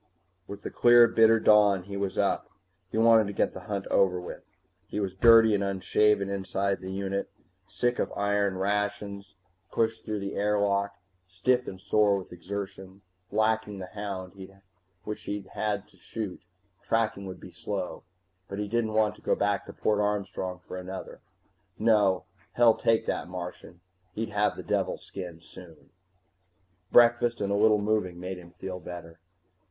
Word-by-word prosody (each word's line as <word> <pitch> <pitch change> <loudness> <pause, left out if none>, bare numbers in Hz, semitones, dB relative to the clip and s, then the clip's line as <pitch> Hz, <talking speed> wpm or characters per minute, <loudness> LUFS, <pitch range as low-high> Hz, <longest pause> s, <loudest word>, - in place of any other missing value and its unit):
With 100 0 -9
the - - -5
clear 120 0 +7
bitter 115 0 +5
dawn 105 -4 +5
he 100 +2 -8
was 100 -1 -3
up. 100 - 0 0.4
He - - -4
wanted 115 -1 +5
to 100 - -5
get - - 0
the - - -7
hunt 100 -2 -2
over 90 -2 +3
with. 90 - -8 0.5
He - - -4
was 95 -3 -2
dirty 115 +2 +7
and 100 -1 +1
unshaven 100 +1 +2
inside 100 0 -1
the 95 0 -6
unit, 100 0 -3 0.4
sick 120 +4 -1
of - - -1
iron 100 -1 0
rations 100 0 -2 0.4
pushed 110 -1 0
through 105 -2 -3
the 100 0 -4
airlock, 100 -1 0 0.3
stiff 125 +7 +1
and 95 - -7
sore 100 +1 +3
with 95 -2 -8
exertion. 95 +1 -7 0.3
Lacking 110 -1 +1
the 95 -1 -8
hound, 100 -3 -5 0.7
which 105 - -6
he'd 100 -1 -4
had 105 -1 -2
to - - -24
shoot, 105 -5 -6 0.4
tracking 110 -4 -1
would 95 - -8
be - - -11
slow, 95 -3 -5 0.5
but 100 - -6
he 105 0 -2
didn't 115 0 -1
want 110 -1 +2
to - - -19
go - - +1
back 100 0 0
to - - -8
Port 105 -1 0
Armstrong 95 -3 -2
for - - -6
another. 95 +1 -7 0.6
No, 105 -5 +3 0.3
hell 120 -2 +6
take 115 0 +1
that 80 - -2
Martian, 90 -1 -8 0.3
he'd 110 0 -3
have 105 0 +1
the - - -6
devil's - - -1
skin 90 -4 -8
soon! 85 -2 -14 1.0
Breakfast 120 0 +5
and 100 -1 -1
a - - +2
little 105 +1 +5
moving 100 -4 -1
made 90 0 -5
him 85 -1 -13
feel 90 +1 -7
better. 85 -1 -9
100 Hz, 165 wpm, -28 LUFS, 95-105 Hz, 1.0 s, clear